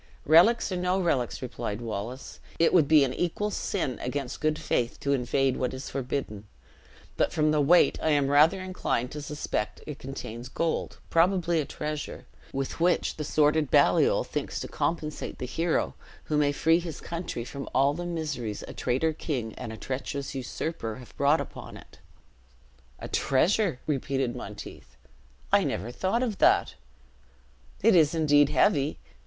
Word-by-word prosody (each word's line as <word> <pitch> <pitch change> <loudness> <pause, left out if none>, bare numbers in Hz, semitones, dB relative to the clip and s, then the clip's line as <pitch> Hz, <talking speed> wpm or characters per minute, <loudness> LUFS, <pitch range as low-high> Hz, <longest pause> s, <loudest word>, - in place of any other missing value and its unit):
"Relics 185 +9 +5
or 185 - -1
no 180 +1 +1
relics," 135 -10 0
replied 110 -3 -4
Wallace, 115 +3 -6 0.2
"it 165 - +3
would 160 -6 +5
be 155 -1 +6
an 130 -2 0
equal 190 +7 -1
sin 170 -11 -2
against 130 +1 -4
good 155 0 +1
faith 120 0 -1
to 140 - +1
invade 135 0 +1
what 130 0 -2
is 130 - -7
forbidden: 125 -6 -4 0.7
but - - +2
from 155 0 +2
the 150 -1 +2
weight 170 +5 +4
I 160 - +1
am 145 -2 +3
rather 155 +7 +5
inclined 185 -9 -2
to 150 - -6
suspect 145 -7 -3
it 150 -2 -7
contains 120 -2 -7
gold; 165 +4 -2
probably 170 0 +3
a - - -4
treasure, 150 +1 -5 0.3
with 135 +3 -4
which 175 +2 +1
the 155 - -3
sordid 150 0 +2
Baliol - - +4
thinks - - -4
to - - -4
compensate 155 -2 -3
the - - -4
hero 165 +6 0 0.3
who 155 - -2
may 145 -1 +3
free 165 +4 +3
his 170 -3 -6
country 170 -8 -5
from 140 +2 -7
all 135 +3 +3
the 175 +4 -5
miseries 145 -11 -4
a - - -8
traitor 135 +6 0
king 125 -8 -3
and 120 -3 -7
a 110 - -7
treacherous 135 +3 -4
usurper 130 -3 -4
have 125 0 -13
brought 140 +3 +3
upon - - -7
it." - - -16 1.0
"A - - -7
treasure!" 170 - +1
repeated 135 -3 -1
Monteith; - - -9 0.5
"I - - +5
never 110 +7 -3
thought 190 - 0
of 220 -6 -3
that; - - +4 1.1
it 225 -2 +6
is 160 -1 +4
indeed 145 -3 +4
heavy! 140 +1 +2
145 Hz, 160 wpm, -27 LUFS, 130-165 Hz, 1.1 s, be